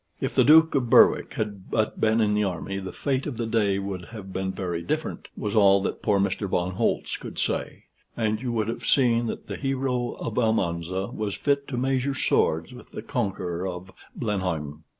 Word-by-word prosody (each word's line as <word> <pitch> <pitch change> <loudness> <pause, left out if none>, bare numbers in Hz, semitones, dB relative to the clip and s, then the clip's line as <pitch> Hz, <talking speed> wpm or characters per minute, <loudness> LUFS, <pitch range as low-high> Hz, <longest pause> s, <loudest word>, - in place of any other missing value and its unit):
"If - - -2
the - - +5
Duke 160 +2 +7
of 125 -4 0
Berwick - - +5
had 100 -3 -4
but 110 -1 -1
been 110 +1 +3
in 105 -1 +2
the 105 0 +2
army, 95 +1 -3
the 95 -1 -6
fate 135 -1 -1
of 135 -6 -5
the 115 - -1
day 105 -3 +1
would 95 -2 -4
have 100 -4 -9
been 95 0 -2
very 90 -3 -3
different," 85 - -3
was 105 - -3
all 100 -2 +6
that - - -3
poor 105 -2 +2
Mr. 100 +1 -1
von 90 0 0
Holtz 95 - -1
could - - -9
say; - - -2 0.3
"and 110 -1 0
you 125 -2 -2
would 110 -2 0
have 115 - -4
seen 120 -3 +3
that - - -5
the - - -6
hero 130 -3 -1
of 115 +1 -3
Almanza 95 -4 0
was 105 -2 -3
fit 140 -1 0
to 125 - -4
measure 135 +1 0
swords 80 -7 +1
with 125 - -13
the - - -7
conqueror 95 - -2
of 90 0 -7 0.2
Blenheim." 80 - -3
105 Hz, 200 wpm, -25 LUFS, 95-120 Hz, 0.3 s, Duke